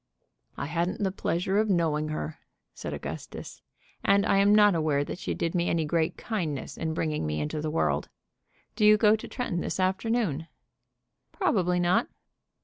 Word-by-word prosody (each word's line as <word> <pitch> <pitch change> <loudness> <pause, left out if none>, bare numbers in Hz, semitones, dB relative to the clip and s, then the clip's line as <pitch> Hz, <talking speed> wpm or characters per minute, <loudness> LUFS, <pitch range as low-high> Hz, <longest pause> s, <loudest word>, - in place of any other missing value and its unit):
"I - - -3
hadn't 170 +6 -1
the 190 - +1
pleasure 190 +1 0
of 215 0 +1
knowing 160 -4 +1
her," 155 0 -4 0.3
said - - -6
Augustus. - - -7 0.4
"And 200 0 +4
I 195 - +3
am 200 +1 +5
not 210 -1 +6
aware 155 -3 +1
that 175 - -6
she - - -3
did 165 - -2
me 175 -1 +1
any 165 -2 +1
great 160 +1 0
kindness 165 - -3
in 160 -1 -3
bringing 155 - -1
me 75 0 -2
into 75 - -2
the 155 - -2
world. 160 - 0 0.7
Do 215 - 0
you 210 0 +7
go 210 0 +5
to 220 - -7
Tretton 215 -9 -3
this - - -3
afternoon?" 190 - 0 0.8
"Probably 180 - +1
not." 180 +7 +2
175 Hz, 170 wpm, -28 LUFS, 155-205 Hz, 0.8 s, you